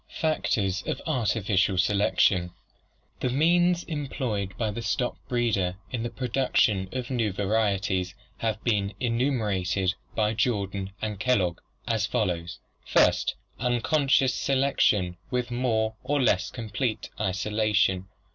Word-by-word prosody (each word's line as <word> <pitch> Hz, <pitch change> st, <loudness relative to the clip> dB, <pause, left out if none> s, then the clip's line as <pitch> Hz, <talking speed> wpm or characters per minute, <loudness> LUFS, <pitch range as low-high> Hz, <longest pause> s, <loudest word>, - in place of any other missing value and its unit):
Factors 100 Hz, -, 0 dB
of -, -, -2 dB
Artificial 105 Hz, -, +1 dB
Selection 95 Hz, -1 st, +3 dB, 0.7 s
The 125 Hz, -, 0 dB
means 175 Hz, +6 st, +3 dB
employed 130 Hz, -, -3 dB
by 110 Hz, -3 st, 0 dB
the 115 Hz, -, -5 dB
stock 115 Hz, +2 st, -1 dB
breeder 105 Hz, -7 st, 0 dB, 0.2 s
in 120 Hz, -, -2 dB
the 120 Hz, -, -2 dB
production 115 Hz, -5 st, +1 dB
of 130 Hz, 0 st, -4 dB
new 115 Hz, -5 st, +1 dB
varieties 100 Hz, -2 st, 0 dB, 0.2 s
have 110 Hz, -1 st, -2 dB
been 105 Hz, -3 st, 0 dB
enumerated 105 Hz, -7 st, 0 dB, 0.2 s
by 105 Hz, -1 st, +2 dB
Jordan 100 Hz, -4 st, -1 dB
and 105 Hz, -3 st, -3 dB
Kellogg 95 Hz, -8 st, +1 dB, 0.3 s
as -, -, +1 dB
follows: 85 Hz, 0 st, -1 dB, 0.3 s
First, -, -, +3 dB, 0.2 s
unconscious 130 Hz, +2 st, +2 dB
selection 125 Hz, -11 st, +1 dB
with 125 Hz, -1 st, -2 dB
more 115 Hz, -3 st, 0 dB
or 145 Hz, +3 st, 0 dB
less 105 Hz, -6 st, +2 dB
complete 115 Hz, 0 st, -3 dB
isola 105 Hz, +2 st, 0 dB
tion. 95 Hz, -2 st, +2 dB
110 Hz, 120 wpm, -27 LUFS, 95-125 Hz, 0.7 s, Selection